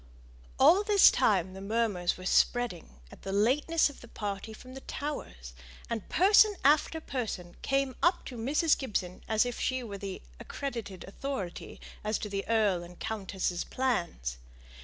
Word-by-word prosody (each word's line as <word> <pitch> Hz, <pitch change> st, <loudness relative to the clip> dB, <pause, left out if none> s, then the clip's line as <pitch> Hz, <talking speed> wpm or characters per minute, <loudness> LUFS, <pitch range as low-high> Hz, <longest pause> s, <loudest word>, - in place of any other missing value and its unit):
All 330 Hz, +9 st, +6 dB
this 410 Hz, -2 st, +7 dB
time 190 Hz, -7 st, +2 dB
the 190 Hz, -, -9 dB
murmurs 205 Hz, -4 st, 0 dB
were 185 Hz, -, -9 dB
spreading 190 Hz, -, +1 dB
at -, -, -14 dB
the 195 Hz, -, -5 dB
lateness 270 Hz, +11 st, +3 dB
of 285 Hz, -, -11 dB
the 240 Hz, -, -12 dB
party 205 Hz, -1 st, -5 dB
from 255 Hz, +4 st, -12 dB
the 270 Hz, -, -9 dB
Towers, -, -, -6 dB, 0.4 s
and 225 Hz, -3 st, -4 dB
person 410 Hz, +3 st, +5 dB
after 300 Hz, +2 st, +4 dB
person 225 Hz, -, -5 dB
came 275 Hz, -2 st, 0 dB
up 345 Hz, +1 st, +2 dB
to 255 Hz, -, -7 dB
Mrs. 285 Hz, +7 st, +2 dB
Gibson 190 Hz, -8 st, -4 dB
as 220 Hz, +1 st, +3 dB
if 245 Hz, -, -4 dB
she 255 Hz, -1 st, -1 dB
were 200 Hz, -4 st, -7 dB
the 195 Hz, -1 st, -6 dB, 0.2 s
accredited 230 Hz, -9 st, -6 dB
authority 200 Hz, -4 st, -6 dB, 0.2 s
as 215 Hz, 0 st, 0 dB
to 210 Hz, -, -5 dB
the 195 Hz, 0 st, -3 dB
earl 210 Hz, -6 st, +2 dB
and 175 Hz, 0 st, -12 dB
countess's 190 Hz, -5 st, -2 dB
plans. 170 Hz, -, -2 dB
225 Hz, 160 wpm, -30 LUFS, 190-270 Hz, 0.4 s, this